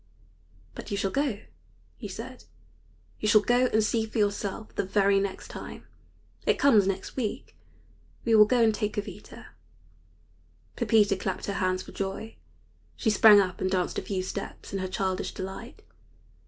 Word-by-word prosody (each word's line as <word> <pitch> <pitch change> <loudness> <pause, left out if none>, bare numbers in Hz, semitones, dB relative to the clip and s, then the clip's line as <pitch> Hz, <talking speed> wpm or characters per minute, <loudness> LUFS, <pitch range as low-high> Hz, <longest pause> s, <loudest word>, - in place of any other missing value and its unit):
"But - - -9
you 200 - -2
shall 195 -1 -1
go," 270 -6 -1 0.5
he - - -7
said; - - -8 0.7
"you 215 - -1
shall 210 0 +6
go 245 +3 +3
and 220 -2 +2
see 220 +1 0
for 220 - -6
yourself 205 0 -1
the - - -1
very 195 0 +3
next 195 -1 -4
time. - - -9 0.6
It - - +3
comes 215 -9 +5
next 195 0 -3
week. 230 -6 -4 0.7
We 230 - +2
will 215 -1 +8
go 240 +1 +3
and 220 -1 +4
take 210 0 -2
Jovita." 205 - -7 1.3
Pepita 210 -3 +3
clapped 190 0 -3
her 200 - -2
hands 185 -1 0
for - - -12
joy. 195 +3 -5 0.6
She 220 - +1
sprang 210 0 +8
up 185 -2 -1
and 190 - +1
danced 185 -1 0
a - - -5
few 190 -2 -3
steps 195 +1 -7
in 195 - -1
her 185 - -2
childish 190 0 -2
delight. 190 +6 -7
205 Hz, 165 wpm, -27 LUFS, 195-220 Hz, 1.3 s, will